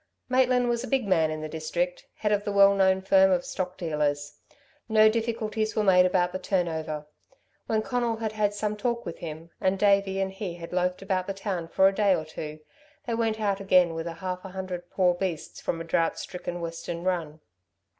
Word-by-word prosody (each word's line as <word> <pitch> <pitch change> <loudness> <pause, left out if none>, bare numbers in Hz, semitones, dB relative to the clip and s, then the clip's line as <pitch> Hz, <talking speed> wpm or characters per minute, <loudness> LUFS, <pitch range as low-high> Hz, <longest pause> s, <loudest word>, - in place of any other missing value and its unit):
Maitland 255 -1 +3
was 240 0 0
a - - -5
big 265 -6 0
man 165 -5 +3
in 155 0 -4
the 155 - -4
district, 170 +3 -3
head 210 - -1
of 205 -1 +2
the 205 - -2
well 200 0 +6
known 190 -1 +3
firm 190 0 +5
of 180 -2 +1
stock 185 -1 -4
dealers; 145 -3 -2 0.5
no 215 0 +6
difficulties 220 -1 -1
were 215 - +2
made 180 -2 +6
about 180 -1 +1
the 185 - -4
turn 185 -2 0
over. 155 -2 -4 0.6
When 220 -1 +1
Conal 240 -2 0
had 220 -1 -3
had 210 -1 0
some 210 0 -1
talk 235 +2 -2
with - - -6
him, 165 0 -8
and 190 +1 +2
Davey 195 -1 +3
and 190 0 -1
he 190 -3 -5
had 170 0 -9
loafed 180 +1 0
about 185 -1 -1
the 195 - -3
town 190 -4 -3
for 190 +3 +4
a 195 - +2
day 200 -2 +3
or 155 - -4
two, 155 0 -7 0.4
they 235 - -2
went 225 -1 0
out 200 -2 0
again 185 -3 +4
with 165 +1 -4
half 180 +2 -5
a 190 - -7
hundred 185 -2 -6
poor 180 -2 +3
beasts 175 -3 -4
from 165 - -2
a - - -4
drought 165 0 0
stricken 175 -1 -6
Western 170 0 -5
run. 170 -4 -2
190 Hz, 210 wpm, -27 LUFS, 170-210 Hz, 0.6 s, well